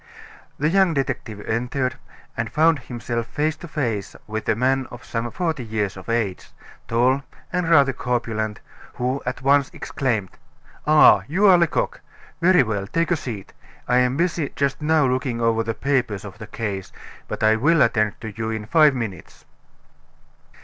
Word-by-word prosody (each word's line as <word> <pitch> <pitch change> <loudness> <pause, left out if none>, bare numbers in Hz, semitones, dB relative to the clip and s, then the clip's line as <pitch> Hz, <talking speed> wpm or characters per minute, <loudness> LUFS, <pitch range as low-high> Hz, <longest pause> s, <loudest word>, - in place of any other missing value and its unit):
The 150 +2 +1
young 190 -2 +3
detective 110 -6 -3
entered, 125 +4 -1 0.4
and 115 -1 -3
found 155 +2 +3
himself 120 -1 -4
face 150 +4 -1
to 170 - -9
face 115 - -3
with 110 0 -4
a - - +3
man 130 +3 +1
of 120 - -11
some 115 0 -3
forty 160 0 -2
years 105 -3 -2
of 95 +3 -10
age, 110 -5 -1 0.4
tall 125 +4 +2 0.3
and 180 -2 0
rather 140 -5 +5
corpulent, 115 -4 -2 0.3
who 130 +3 -1
at 125 +1 -3
once 140 0 +4
exclaimed: 110 -8 -2 0.5
"Ah! 155 0 +7
you 185 +8 +2
are 190 -3 +8
Lecoq. 170 -2 0 0.4
Very 180 -4 +5
well 105 -4 -3
take 165 - 0
a - - +4
seat. 115 - -7 0.3
I 125 - +3
am 125 +1 +2
busy 170 -3 0
just 140 +1 -1
now 155 -1 +3
looking 130 -2 -1
over 115 -1 +2
the 115 0 -3
papers 125 -8 -1
of 100 +1 -10
the 110 - -8
case, 100 -4 -4 0.4
but - - -4
I 110 0 +5
will 150 +7 +4
attend 110 -3 +1
to 110 -2 -6
you 110 0 -3
in 110 -1 -4
five 150 +3 +5
minutes." 100 - -6
125 Hz, 165 wpm, -22 LUFS, 110-145 Hz, 0.5 s, are